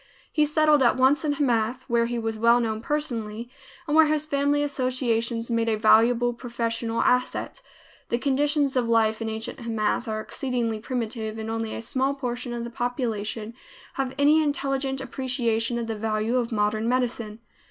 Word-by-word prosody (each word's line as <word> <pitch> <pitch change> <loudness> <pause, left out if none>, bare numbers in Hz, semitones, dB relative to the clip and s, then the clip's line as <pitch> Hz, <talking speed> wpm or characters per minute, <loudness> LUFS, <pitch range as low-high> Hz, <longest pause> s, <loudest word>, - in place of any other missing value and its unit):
He 305 -1 +2
settled 305 -1 +4
at 245 0 +4
once 265 +3 +4
in 295 -2 +1
Hamath, 250 -3 0
where 235 -2 +2
he 240 0 -3
was 225 -1 -2
well 235 +2 +5
known 220 -2 -2
personally, 235 -5 -3 0.3
and 295 - 0
where 320 -1 +7
his 305 0 +1
family 290 -1 +1
associations 245 -4 -1
made 230 0 +1
a 220 - +1
valuable 230 +3 +4
professional 230 -1 -2
asset. 250 - 0 0.5
The 235 - +1
conditions 285 +1 +1
of 245 -2 +1
life 220 -1 +2
in 225 - -2
ancient 220 +4 -5
Hamath 230 0 -1
are 215 -1 -2
exceedingly 235 -2 -2
primitive 225 -2 -4
and 220 0 -4
only 225 -1 -3
a - - -6
small 265 +4 0
portion 245 -2 -4
of 235 -1 -4
the 235 - -6
population 230 -3 -3 0.4
have 265 -1 -3
any 295 +2 +5
intelligent 275 -2 -1
appreciation 245 -3 -1
of 235 - -2
the 225 -1 -3
value 215 +2 -1
of 240 -1 -1
modern 215 +1 0
medicine. 240 -4 -1
240 Hz, 170 wpm, -25 LUFS, 225-270 Hz, 0.5 s, where